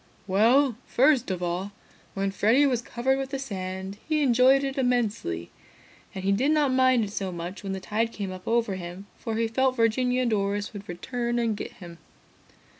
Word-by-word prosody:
"Well, 230 Hz, +6 st, +3 dB
first 260 Hz, -2 st, +3 dB
of 180 Hz, -1 st, -3 dB
all, 180 Hz, +3 st, -3 dB, 0.4 s
when 195 Hz, 0 st, -1 dB
Freddy 225 Hz, +8 st, +3 dB
was 250 Hz, -4 st, +1 dB
covered 260 Hz, +3 st, -1 dB
with 270 Hz, -1 st, -3 dB
the 275 Hz, -, -3 dB
sand, 190 Hz, -5 st, -5 dB
he 305 Hz, -1 st, +2 dB
enjoyed 260 Hz, +2 st, +5 dB
it 270 Hz, 0 st, -2 dB
immensely. 220 Hz, -, -1 dB, 0.6 s
And 190 Hz, -, -5 dB
he 195 Hz, -, +2 dB
did 250 Hz, +9 st, +2 dB
not 300 Hz, -4 st, +3 dB
mind 255 Hz, -2 st, +4 dB
it 205 Hz, -, -4 dB
so 195 Hz, -2 st, -3 dB
much 175 Hz, +2 st, -6 dB
when 195 Hz, -1 st, -4 dB
the 190 Hz, -, -3 dB
tide 220 Hz, +4 st, -1 dB
came 200 Hz, -4 st, -5 dB
up 185 Hz, 0 st, -10 dB
over 230 Hz, -3 st, +1 dB
him, 180 Hz, +2 st, -8 dB
for 225 Hz, -, -3 dB
he 230 Hz, 0 st, +1 dB
felt 260 Hz, +3 st, +1 dB
Virginia 250 Hz, +2 st, +2 dB
and 240 Hz, -, 0 dB
Doris 205 Hz, 0 st, -1 dB
would 205 Hz, -2 st, -9 dB
return 240 Hz, +7 st, -3 dB
and 230 Hz, -2 st, +1 dB
get -, -, -6 dB
him. 170 Hz, -3 st, -12 dB
225 Hz, 190 wpm, -26 LUFS, 195-255 Hz, 0.6 s, enjoyed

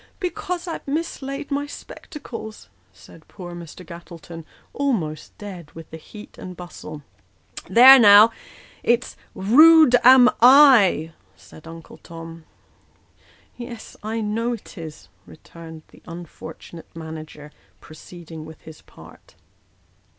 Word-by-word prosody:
" -, -, -38 dB
"Because 360 Hz, -1 st, -5 dB
I've 330 Hz, -, -7 dB
mislaid 280 Hz, -2 st, -5 dB
my 285 Hz, +1 st, -2 dB
spectacles," 230 Hz, -, -11 dB, 0.2 s
said 155 Hz, -, -19 dB
poor 175 Hz, -2 st, -11 dB
Mr. 175 Hz, +1 st, -11 dB
Gattletou, 170 Hz, 0 st, -12 dB, 0.3 s
almost 200 Hz, -, -4 dB
dead 185 Hz, -7 st, -10 dB
with 165 Hz, -1 st, -13 dB
the 160 Hz, -, -8 dB
heat 210 Hz, +6 st, -14 dB
and 180 Hz, -1 st, -10 dB
bustle. 155 Hz, -4 st, -11 dB, 0.3 s
" -, -, -15 dB
There, 255 Hz, +7 st, +8 dB
now 210 Hz, 0 st, +7 dB, 0.5 s
it's 240 Hz, +1 st, -1 dB, 0.2 s
' -, -, -38 dB, 0.2 s
rude 315 Hz, -2 st, +7 dB
am 255 Hz, 0 st, +7 dB
I,' 240 Hz, -, +5 dB
" -, -, -37 dB
said 155 Hz, -, -16 dB
Uncle 165 Hz, 0 st, -13 dB
Tom. 165 Hz, -1 st, -12 dB, 0.5 s
" -, -, -37 dB, 0.3 s
Yes, 240 Hz, -2 st, -10 dB
I 220 Hz, +2 st, -4 dB
know 225 Hz, +3 st, -2 dB
it 230 Hz, -, -11 dB
is," 160 Hz, -3 st, -11 dB, 0.2 s
returned 160 Hz, -, -14 dB
the -, -, -20 dB
unfortunate 165 Hz, -1 st, -12 dB
manager, 155 Hz, -2 st, -10 dB, 0.3 s
proceeding 160 Hz, 0 st, -13 dB
with 160 Hz, 0 st, -13 dB
his 160 Hz, -1 st, -14 dB
part. -, -, -18 dB
180 Hz, 130 wpm, -21 LUFS, 160-245 Hz, 0.5 s, There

